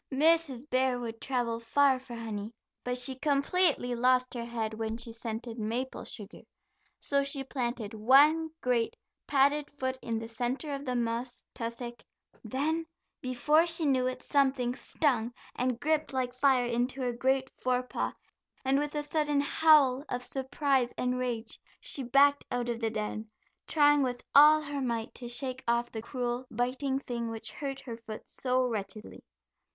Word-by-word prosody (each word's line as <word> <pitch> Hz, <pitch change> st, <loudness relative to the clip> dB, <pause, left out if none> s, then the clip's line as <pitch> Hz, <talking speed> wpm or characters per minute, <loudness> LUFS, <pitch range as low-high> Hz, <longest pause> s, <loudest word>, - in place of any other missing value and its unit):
Mrs. 295 Hz, -2 st, +2 dB
Bear 255 Hz, -2 st, +1 dB
would 230 Hz, -2 st, -6 dB
travel 240 Hz, -3 st, -1 dB
far 260 Hz, +3 st, +3 dB
for 255 Hz, -2 st, -9 dB
honey, 220 Hz, -1 st, -5 dB, 0.3 s
but 250 Hz, 0 st, -1 dB
she 250 Hz, +1 st, +1 dB
completely 285 Hz, -2 st, +2 dB
lost 255 Hz, +1 st, +2 dB
her 235 Hz, -2 st, -4 dB
head 225 Hz, -2 st, -3 dB
when 220 Hz, 0 st, -3 dB
she 235 Hz, 0 st, -6 dB
scented 230 Hz, +1 st, -5 dB
maple 235 Hz, +5 st, -3 dB
sugar, 205 Hz, -3 st, -7 dB, 0.6 s
so 280 Hz, -1 st, +1 dB
she 275 Hz, 0 st, 0 dB
planted 240 Hz, -5 st, -3 dB
one 285 Hz, +9 st, +5 dB
great, 240 Hz, -2 st, +1 dB, 0.3 s
padded 285 Hz, +1 st, +3 dB
foot 260 Hz, -2 st, -3 dB
in 230 Hz, -1 st, -2 dB
the 225 Hz, 0 st, -5 dB
center 245 Hz, +6 st, -3 dB
of 280 Hz, +1 st, -5 dB
the 250 Hz, -1 st, -1 dB
moss 240 Hz, +1 st, -2 dB
tussock, 235 Hz, +1 st, -6 dB, 0.4 s
then, 305 Hz, +8 st, -1 dB, 0.3 s
before 300 Hz, +6 st, +3 dB
she 330 Hz, -1 st, 0 dB
knew 260 Hz, -3 st, +2 dB
it, 255 Hz, -, -4 dB
something 265 Hz, -3 st, +2 dB
stung 245 Hz, -5 st, 0 dB, 0.2 s
and 250 Hz, -1 st, -1 dB
gripped 310 Hz, +3 st, 0 dB
like 255 Hz, -2 st, -1 dB
fire 255 Hz, -1 st, +3 dB
into 245 Hz, +3 st, -1 dB
her 245 Hz, -1 st, 0 dB
great 265 Hz, +2 st, +1 dB
fore 250 Hz, 0 st, +1 dB
paw, 250 Hz, -, -2 dB, 0.5 s
and 270 Hz, +1 st, +3 dB
with 295 Hz, +1 st, -3 dB
a 295 Hz, -, -1 dB
sudden 295 Hz, -1 st, +1 dB
howl 285 Hz, -3 st, +5 dB
of 250 Hz, 0 st, -3 dB
surprise 265 Hz, -1 st, 0 dB
and 250 Hz, 0 st, 0 dB
rage, 240 Hz, -3 st, -3 dB, 0.2 s
she 275 Hz, -, -1 dB
backed 280 Hz, +3 st, +4 dB
out 245 Hz, -1 st, -2 dB
of 235 Hz, -1 st, -2 dB
the 225 Hz, -1 st, 0 dB
den, 215 Hz, 0 st, -4 dB, 0.4 s
trying 290 Hz, -1 st, +5 dB
with 245 Hz, -2 st, -2 dB
all 305 Hz, +2 st, +8 dB
her 285 Hz, -1 st, -4 dB
might 235 Hz, -3 st, -2 dB
to 245 Hz, -, -7 dB
shake 255 Hz, +1 st, -3 dB
off 235 Hz, 0 st, +1 dB
the 220 Hz, -, -5 dB
cruel, 245 Hz, +1 st, -3 dB
biting 255 Hz, +4 st, -1 dB
thing 235 Hz, -4 st, -4 dB
which 225 Hz, -1 st, -5 dB
hurt 275 Hz, 0 st, -4 dB
her 235 Hz, -3 st, -7 dB
foot 225 Hz, -2 st, -9 dB
so 255 Hz, 0 st, 0 dB
wretchedly. 215 Hz, -2 st, -5 dB
255 Hz, 165 wpm, -30 LUFS, 235-275 Hz, 0.6 s, all